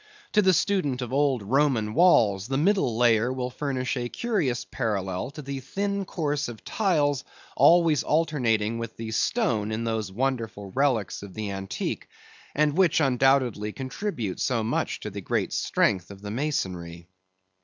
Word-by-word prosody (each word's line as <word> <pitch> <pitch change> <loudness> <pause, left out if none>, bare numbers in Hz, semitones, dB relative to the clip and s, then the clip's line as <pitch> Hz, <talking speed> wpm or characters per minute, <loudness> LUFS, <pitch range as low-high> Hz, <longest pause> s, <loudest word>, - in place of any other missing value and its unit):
To 210 - +4
the 190 -2 +5
student 160 -8 +1
of 125 - -6
old 135 -5 +2
Roman 120 -2 +1
walls, 110 - +4
the 135 +1 -1
middle 160 - +2
layer 120 0 +3
will 125 -1 -3
furnish 130 -2 -2
a 120 -1 -3
curious 175 - -1
parallel 95 -2 -2
to 150 +1 -9
the 135 0 -4
thin 200 +8 -2
course 150 -5 -2
of 120 -2 -9
tiles 150 - +1 0.3
always 165 -4 +5
alternating 120 -9 +1
with 115 -1 -6
the 115 -1 -5
stone 110 - 0
in 110 +1 -2
those 110 -4 -2
wonderful 115 -4 -2
relics 130 -5 0
of 100 -2 -10
the 105 -2 -3
antique, 95 0 -4 0.5
and 150 0 +2
which 180 -4 +4
undoubtedly 130 -6 +2
contribute 130 - -4
so 120 -4 0
much 110 - -1
to 105 - -5
the 100 +1 -6
great - - -1
strength 90 -3 +1
of 100 0 -12
the 105 - -5
masonry. 90 - -3
125 Hz, 155 wpm, -26 LUFS, 110-150 Hz, 0.5 s, the